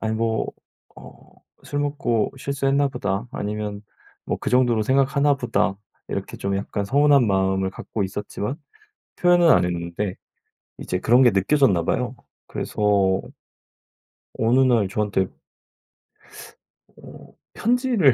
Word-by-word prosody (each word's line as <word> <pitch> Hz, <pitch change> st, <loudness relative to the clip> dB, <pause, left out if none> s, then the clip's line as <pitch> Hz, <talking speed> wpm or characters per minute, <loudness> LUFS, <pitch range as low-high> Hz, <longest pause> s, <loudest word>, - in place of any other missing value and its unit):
'아니 110 Hz, 0 st, -1 dB
뭐 110 Hz, 0 st, 0 dB, 0.5 s
어 -, -, -12 dB, 0.5 s
술 145 Hz, -, -3 dB
먹고 140 Hz, -6 st, 0 dB
실수했나 140 Hz, +1 st, 0 dB
보다.' 105 Hz, -4 st, -3 dB
아니면 105 Hz, -2 st, -4 dB, 0.4 s
뭐 -, -, -2 dB
'그 -, -, -3 dB
정도로 125 Hz, -3 st, +3 dB
생각하나 140 Hz, +4 st, +2 dB
보다.' 115 Hz, -6 st, 0 dB, 0.3 s
이렇게 -, -, -5 dB
좀 100 Hz, 0 st, -2 dB
약간 100 Hz, +1 st, -3 dB
서운한 140 Hz, +2 st, +4 dB
마음을 95 Hz, -1 st, +1 dB
갖고 105 Hz, +2 st, -5 dB
있었지만 105 Hz, +5 st, -4 dB, 0.6 s
표현은 175 Hz, -1 st, +4 dB
안 -, -, +4 dB
했는데 85 Hz, +3 st, -3 dB, 0.6 s
이제 90 Hz, -, -3 dB
그런 120 Hz, +6 st, +4 dB
게 120 Hz, -, +6 dB
느껴졌나 100 Hz, -, +2 dB
봐요. 125 Hz, +7 st, -1 dB, 0.3 s
그래서 100 Hz, -3 st, +1 dB, 1.2 s
어느 120 Hz, +4 st, +3 dB
날 115 Hz, -6 st, +3 dB
저한테 100 Hz, -2 st, 0 dB, 1.7 s
어. -, -, -14 dB, 0.2 s
편지를 235 Hz, -, +2 dB
115 Hz, 250 characters per minute, -23 LUFS, 100-140 Hz, 1.7 s, 게